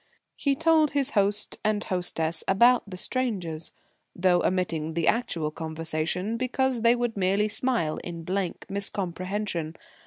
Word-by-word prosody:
He 280 -1 +1
told 320 -1 +3
his 280 0 +1
host 205 -1 +1
and 210 -1 +1
hostess 165 -3 -1
about 235 +3 +4
the 185 - -7
strangers, 180 -10 -2 0.4
though 180 -1 +3
omitting 165 -4 -1
the 170 -2 0
actual 170 -10 +1
conversation 165 +6 -2
because 255 0 0
they 235 +1 +5
would 240 -2 -1
merely 195 +2 +2
smile 220 -8 0
in 170 -1 -7
blank 185 +1 -2
miscomprehension. 190 -3 -3
195 Hz, 130 wpm, -27 LUFS, 170-235 Hz, 0.4 s, they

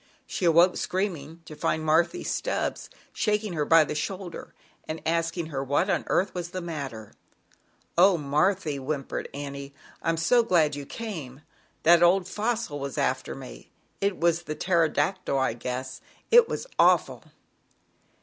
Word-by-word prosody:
She 185 - -3
awoke, 170 +2 +5
screaming, 170 -4 -3
to 155 - -10
find 155 +1 -1
M 170 +2 +2
Stubbs - - -2 0.2
shaking 210 -2 0
her 150 -3 -1
by 165 +1 +6
the 150 - -4
shoulder, 180 +3 -5 0.3
anc 160 +1 -5
asking 165 0 -1
what 140 +7 0
on - - 0
earth 195 - +1
was 175 -1 -4
the 185 0 -5
m 135 -10 -6 0.8
"Oh, 180 +1 +6
Marthy," 150 +2 0
whimpered 135 0 -4
Annie, 140 0 -7 0.4
so 170 +10 +4
glad 165 -9 +2
you 140 -1 -7
came, 155 - -7 0.4
that 170 +1 +6
old 180 +1 +4
Fossil 205 - -2
after - - -1
me, - - -11 0.3
it 200 -1 0
was 170 0 +2
the 155 -3 -5
Pterodactyl, 170 -1 +1
I 130 -3 +1
guess, 125 +2 -5 0.3
it 470 0 +7
was - - -3
awful." - - +3
165 Hz, 140 wpm, -26 LUFS, 145-185 Hz, 0.8 s, it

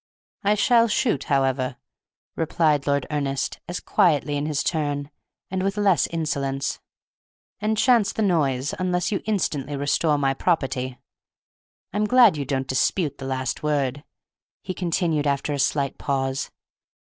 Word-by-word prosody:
"I 205 +1 +3
shall 230 +2 +4
shoot, 215 - 0
however," 135 -2 +1 0.6
replied 155 -3 +1
Lord 140 -2 +1
Ernest, 140 -2 -2
as 175 - -4
quietly 150 -4 +2
in 145 +1 -1
his 150 -2 -1
turn, 145 -3 -2 0.4
and 190 0 -1
with 195 +2 -1
less 200 -4 +3
insolence, 140 -5 -2 0.8
"and 215 +1 0
chance 235 -3 +4
the 220 - -1
noise, 145 -8 +1
unless 180 0 0
you 200 - -1
instantly 150 -9 -1
restore 145 +2 +1
my 135 -1 +1
property. 130 -5 -1 1.0
I - - -2
am 210 - +2
glad 240 -4 +6
you 145 -2 -3
don't 135 -1 -1
dispute 145 +3 0
the 135 - -6
last 130 -1 -2
word," 145 -2 -1 0.6
he 185 - -4
continued 165 -4 0
after 140 +1 0
a 140 - -3
slight 140 +1 0
pause. 135 -1 -1
150 Hz, 145 wpm, -24 LUFS, 135-180 Hz, 1.0 s, glad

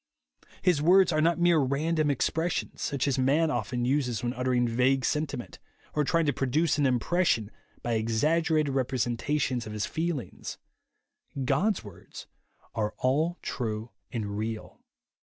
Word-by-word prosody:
His 175 -5 +3
words 180 +3 +5
are 155 -1 +2
not 165 +2 +3
mere 175 -2 +4
random 150 +3 +1
expressions, 160 +5 -1
such 140 -2 -1
as 135 -1 +1
man 150 +5 +3
often 120 0 -1
uses 125 -3 0
when 120 0 -1
uttering 125 -1 +1
vague 125 +3 +2
sentiment, 150 -5 -2 0.3
or 150 - +2
trying 165 +3 +2
to 145 - +2
produce 150 +4 +1
an 145 - +3
impres 150 +8 +1
sion 110 -6 +1 0.3
by 120 - -1
exaggerated 150 +7 +1
representations 130 0 -1
of 105 - -6
his 105 0 -1
feelings. 160 - -4 0.9
God's 205 +8 +1
words 95 -4 -11 0.5
are 105 -1 -2
all 155 +7 +1
true 110 -2 -3 0.2
and 105 -4 -3
real. 110 0 -5
135 Hz, 140 wpm, -28 LUFS, 120-160 Hz, 0.9 s, words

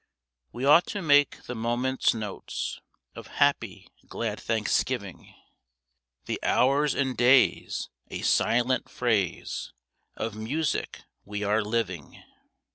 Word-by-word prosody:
We 125 +3 -4
ought 150 +5 +6
to 205 - -4
make 145 -2 +3
the 125 - -6
moments 120 +3 0
notes 105 -3 -5 0.3
Of - - -10
happy, - - +1 0.2
glad 110 -2 -4
Thanksgiving; 110 -2 -2 0.9
The - - -3
hours 140 +3 +2
and 130 -2 0
days 125 +3 +3 0.2
a - - -6
silent 125 +2 +2
phrase 110 -7 -1 0.4
Of 115 -1 -4
music 135 +7 -2 0.2
we 105 0 -5
are 105 +2 +2
living. 100 - -3
120 Hz, 110 wpm, -27 LUFS, 110-130 Hz, 0.9 s, ought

